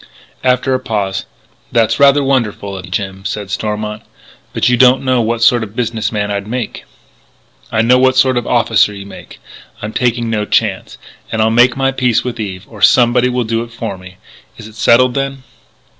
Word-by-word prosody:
After 130 +1 +1
a 130 - +1
pause: 105 -6 -3 0.4
"That's 115 +2 +1
rather 140 0 +5
wonderful 110 -7 -1
of 95 -1 -8
you, - - -14
Jim," 95 0 -4
said 100 -1 -5
Stormont, 105 +1 -3 0.5
"but - - 0
you 125 - +3
don't 130 +2 +4
know 130 -2 +2
what 115 +1 -1
sort 120 0 +4
of 110 -1 -7
business 115 -2 -2
man 105 -2 -2
I'd 100 0 -3
make 125 +2 -5 0.4
" - - -33
"I 110 - +1
know 125 +2 +4
what 130 0 +3
sort 130 -1 +4
of 120 -1 -2
officer 115 -3 +2
you 100 0 -9
made.... 100 - -12 0.4
I'm 105 +1 -6
taking 120 -1 0
no 110 -2 -1
chance.... - - -1 0.3
And 110 - -2
I'll 110 0 +2
make 120 +2 +4
my 135 0 +1
peace 125 -3 +1
with 125 -2 -5
Eve 95 -3 -5
or 110 -3 -13
somebody 120 +3 +4
will 125 0 -1
do 115 0 -2
it 115 0 -8
for 115 - -5
me.... 95 0 -14 0.4
Is 110 - -10
it 110 - -14
settled 125 +3 +3
then?" 135 0 -3
115 Hz, 200 wpm, -15 LUFS, 105-125 Hz, 0.5 s, rather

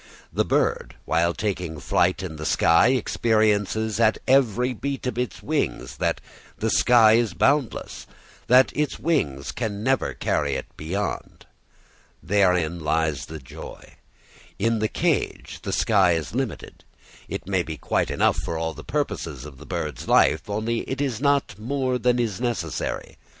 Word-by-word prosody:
The - - +2
bird, - - 0
while 85 +1 +2
taking 90 -6 -3
its 70 - -11
flight 90 +2 +2
in 80 -4 -6
the 75 - -6
sky, 85 +6 +4
experiences 110 -3 +1
at 110 -1 +4
every 125 -2 +3
beat 135 +3 -4
of 125 - -2
its 125 -8 -3
wings - - -2
that - - 0 0.4
the 110 0 -1
sky 115 -3 +6
is 115 -5 +2
boundless, 140 -4 0 0.4
that 125 +2 +5
its 150 0 -1
wings 75 - -1
can 105 -3 -4
never 135 +2 +1
carry 70 -2 0
it - - -4
beyond. 95 +7 -4 0.8
Therein 90 -3 +2
lies 80 -2 -1
its - - -8
joy. 65 - -11 0.6
In 115 +2 +1
the 110 - +1
cage - - -1
the - - -4
sky 95 -5 +3
is 80 +1 -3
limited; 125 -5 -4 0.5
it - - -5
may 95 -2 +1
be 80 -2 -6
quite - - 0
enough - - +2
for 85 - -3
all 80 0 -2
the - - -10
purposes 80 - -3
of 70 -3 -11
the 75 - -12
bird's 75 -8 -4
life, - - +3
only 110 +3 -1
it 135 - -3
is 135 -5 -2
not 140 -8 +1
more 130 +2 -1
than 125 0 +2
is 115 -4 -1
necessary. 115 -10 -3
105 Hz, 155 wpm, -24 LUFS, 85-125 Hz, 0.8 s, sky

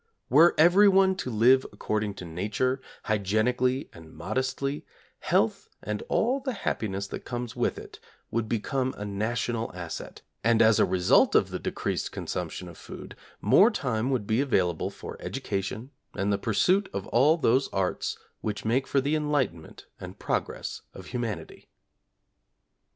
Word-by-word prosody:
Were 165 +6 +6
everyone 190 +3 +6
to 130 - -4
live 125 +4 +5
according 105 -1 -2
to 90 - -8
Nature, 105 +10 -1 0.2
hygienically 120 +6 +1
and 80 -2 -13
modestly, 130 - -2 0.4
health, - - 0
and 105 0 -3
all 255 +4 +2
the 260 -1 -3
happiness 100 -2 -1
that - - -5
comes 120 -1 -5
with - - 0
it, - - -10 0.3
would 115 -1 -1
become 130 +3 -1
a 105 - -5
national 115 +3 -2
asset, 85 -2 -7 0.2
and 115 0 +3
as 110 -1 +5
a - - +5
result 90 -1 +4
of - - +3
the - - -3
decreased - - -3
consumption 90 - -5
of 85 - -12
food, - - -10 0.3
more 205 +5 +6
time 125 - -1
would 125 -6 0
be 110 +4 +1
available 90 - +1
for - - -9
education, 100 +6 -4 0.2
and 100 +2 0
the 100 - 0
pursuit 185 - +2
of 100 0 -3
all 145 +7 +4
those 135 -3 +2
arts 95 -2 -1 0.2
which 105 -1 -4
make 125 +4 +1
for 140 - +2
the 145 +3 0
enlightenment 145 - -2
and - - -9
progress - - -3
of - - -10
humanity. 110 -10 -5
115 Hz, 150 wpm, -27 LUFS, 100-135 Hz, 0.4 s, Were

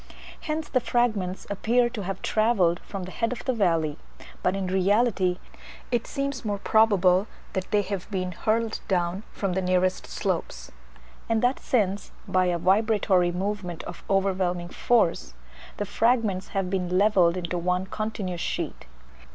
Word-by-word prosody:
Hence 310 -1 -3
the 255 - +2
fragments 220 -7 0
appear 240 +4 +2
to 225 - -5
have 195 0 -5
travelled 205 -6 +2
from 195 -2 -7
the 185 - -7
head 230 +3 -1
of 250 - -6
the 260 - +1
valley; 165 -8 +1 0.4
but 180 - +1
in 195 -1 -2
reality 190 0 +2 0.5
it 240 -2 0
seems 275 -2 -3
more 205 -2 -1
probable 200 -3 +4 0.3
that 190 0 -3
they 210 -2 +2
have 195 -1 -5
been 185 -3 -2
hurled 220 +4 0
down 180 -1 0
from 195 -3 -2
the 190 - 0
nearest 185 0 +1
slopes; - - -3 0.6
and 225 0 +1
that 250 +2 +2
since, 205 -5 0 0.2
by 185 0 +2
a 175 -1 +1
vibratory 190 -1 +3
movement 185 -2 -3
of 175 - -9
overwhelming 185 -3 +1
force, 180 - +1 0.4
the 205 - -2
fragments 220 -3 +1
have 195 -2 -2
been 180 -2 0
levelled 185 -4 +4
into 175 0 -2
one 180 +2 0
continuous 195 -4 -4
sheet. - - -4
195 Hz, 150 wpm, -26 LUFS, 180-220 Hz, 0.6 s, probable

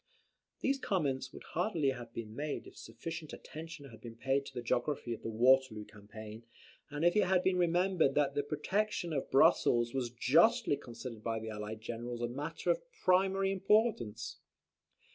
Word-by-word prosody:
These 275 0 +1
comments 145 - -1
would - - -11
hardly 170 -5 +1
have 120 -3 -5
been 110 -2 -7
made 150 +1 -3
if - - -13
sufficient 165 -2 -7
attention 155 -3 -9
had 115 - -14
been 115 -1 -9
paid 135 +3 0
to - - -10
the 120 - -4
geography 120 +1 -1
of 115 - -8
the - - -4
Waterloo 120 -1 +3
campaign; 105 +1 -10 0.5
and 150 +2 -2
if 175 - +4
it 210 -2 +4
had 185 0 +2
been 185 -1 +2
remembered 175 -3 +2
that 145 -2 +2
the 145 - +1
protection 175 +4 -1
of 135 - -2
Brussels 120 -3 +4
was 130 -3 -1
justly 160 - +4
considered 115 -3 -8
by 115 -1 -1
the 110 0 -5
allied 105 0 -6
generals 120 +1 -5
a - - +1
matter 140 +5 -2
of - - 0 0.2
primary 195 +1 +3
importance. 195 - +1
135 Hz, 170 wpm, -33 LUFS, 115-175 Hz, 0.5 s, if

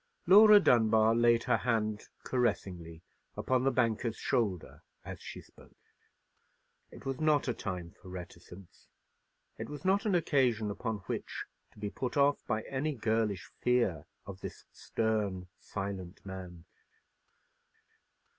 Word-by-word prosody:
Laura 210 +2 +9
Dunbar 110 - +4
laid 115 0 +4
her - - +2
hand 110 -3 -1 0.2
caressingly 90 -9 -2 0.3
upon 130 -1 +1
the 135 - +4
banker's 115 -3 0
shoulder 100 -8 -1 0.2
as - - -8
she - - -8
spoke. - - -20 1.1
It - - -13
was 135 -1 -3
not 150 -3 +3
a 125 - +1
time 90 -5 -5
for 95 - -12
reticence; 90 0 -11 0.7
it - - -5
was 150 +4 -8
not 195 +3 +2
an 195 - +2
occasion 125 -10 +2
upon 110 0 -4
which - - -4 0.3
to - - -24
be 105 -1 -4
put 125 0 -4
off 140 0 +3
by 110 -2 -1
any 145 +3 -2
girlish 110 -4 0
fear 100 -11 +1 0.2
of 95 -1 -8
this - - -8
stern, 105 -5 -2
silent 95 -2 -6
man. 90 -3 -8
110 Hz, 130 wpm, -31 LUFS, 95-125 Hz, 1.1 s, Laura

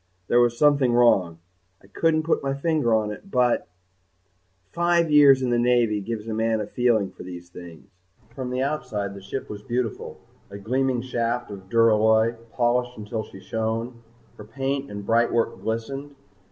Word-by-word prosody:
There 120 - +4
was 120 -1 +2
something 145 -4 +3
wrong. 95 -9 +3 0.5
I - - -18
couldn't 155 +10 0
put 165 - 0
my 135 0 -2
finger 150 -4 0
on 110 -1 +1
it 195 - -10
but_ 125 -7 +1 1.1
five 170 -1 +1
years 140 -3 +6
in 125 - 0
the 120 - +2
Navy 120 -3 +2
gives 110 +1 -5
a 110 - -3
man 110 0 0
a 105 - -2
feeling 115 -4 +1
for - - -14
these 90 -1 -9
things. 85 -2 -12 0.5
From 130 0 -5
the 125 +1 -1
outside 105 -9 -3
the 100 - -10
ship 100 +8 -6
was 105 -1 -8
beautiful, 120 0 -4 0.3
a 100 - -8
gleaming 125 +4 -1
shaft 120 -2 -2
of 95 -2 -10
duralloy, 110 0 +3 0.2
polished 125 0 0
until 110 +1 -4
she 95 - -12
shone. 115 +3 -3 0.4
Her - - -8
paint 135 +4 -3
and 100 -1 -7
brightwork 115 +1 +1
glistened. 135 +6 -4
120 Hz, 165 wpm, -24 LUFS, 105-130 Hz, 1.1 s, years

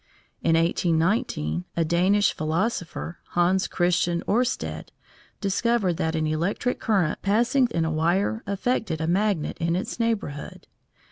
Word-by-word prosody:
In 165 - +3
1819, 165 - +1
a 165 - +2
Danish 185 +5 +3
philosopher, 170 +1 -2
Hans 180 +2 +2
Christian 175 -1 +1
Oersted, 245 +4 -1 0.5
discovered 200 -2 +1
that 160 0 -1
an 160 -1 0
electric 170 +10 -1
current 190 -8 +1
passing 240 +6 +3
in 165 -5 0
a 160 - -1
wire 175 +8 +1
affected 200 -4 -1
a 160 - -1
magnet 190 -1 0
in 170 0 0
its 190 +5 -4
neighbourhood. 215 -11 -3
180 Hz, 125 wpm, -25 LUFS, 165-210 Hz, 0.5 s, In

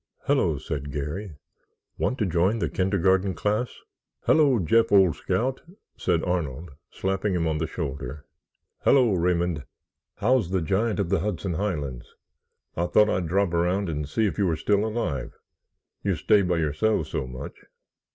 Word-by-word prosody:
"Hello," - - +2
said 70 -1 -5
Garry; 75 +6 -4 0.6
"want 130 - 0
to 110 - 0
join 90 +4 +2
the - - -2
kindergarten 95 0 +1
class?" 105 +7 0 0.5
"Hello, 145 -5 +4
Jeff, 110 +5 +3
old 95 -5 +5
scout!" 130 +2 -1 0.3
said 85 -3 0
Arnold, 85 -3 -2 0.2
slapping 95 +1 -1
him 85 -2 0
on 80 -1 0
the 80 - -1
shoulder. 70 -3 -5 0.5
"Hello, 125 -6 +4
Raymond, 85 -3 0 0.5
how's 115 -2 +2
the 95 0 +1
giant 105 +7 0
of 95 -4 0
the - - +2
Hudson 95 -1 -2
Highlands? 75 -10 -3 0.6
I 85 +1 0
thought 105 +3 +4
I'd 90 -2 -1
drop 95 +1 +1
around 90 +3 +1
and 75 -2 -3
see 110 +8 +1
if 105 - -2
you 100 - +3
were 85 - +1
still 100 +5 +1
alive—you 90 - -5
stay 105 - +3
by 90 -2 0
yourselves 80 +8 0
so 65 - -2
much." 65 +2 -8
90 Hz, 150 wpm, -25 LUFS, 80-105 Hz, 0.6 s, old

